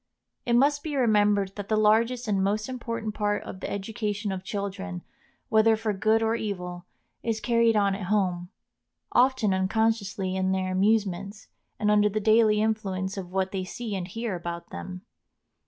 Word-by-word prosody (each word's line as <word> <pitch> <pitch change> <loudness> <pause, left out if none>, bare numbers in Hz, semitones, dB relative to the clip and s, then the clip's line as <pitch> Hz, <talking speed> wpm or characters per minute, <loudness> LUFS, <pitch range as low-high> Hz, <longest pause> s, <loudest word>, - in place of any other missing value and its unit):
It 240 - +2
must 285 +4 +4
be 300 -2 -4
remembered 205 -5 +2
that 205 0 -6
the 215 - +2
largest 230 +3 +3
and 195 -2 +1
most 210 +2 0
important 230 -4 -4
part 205 -1 -1
of 185 - -8
the - - -5
education 210 0 -3
of 190 -1 -4
children, 195 -2 -5 0.5
whether 220 0 +5
for 220 -1 -1
good 220 +3 +2
or 225 0 +2
evil, 180 -5 -4 0.3
is 225 -1 -1
carried 230 -1 +3
on 200 -2 +3
at 195 -2 -5
home, 180 -4 0 0.6
often 245 -5 +3
unconsciously 195 -1 0
in 190 0 +1
their 185 -1 -1
amusements, 200 0 0 0.3
and 210 0 +2
under 210 0 +4
the 215 +1 -1
daily 215 0 +4
influence 195 -3 -2
of 185 -3 -6
what 190 0 -1
they 190 -1 -2
see 215 +3 -5
and 180 -2 -4
hear 225 +1 -4
about 170 0 -6
them. 180 0 -7
205 Hz, 170 wpm, -26 LUFS, 190-220 Hz, 0.6 s, whether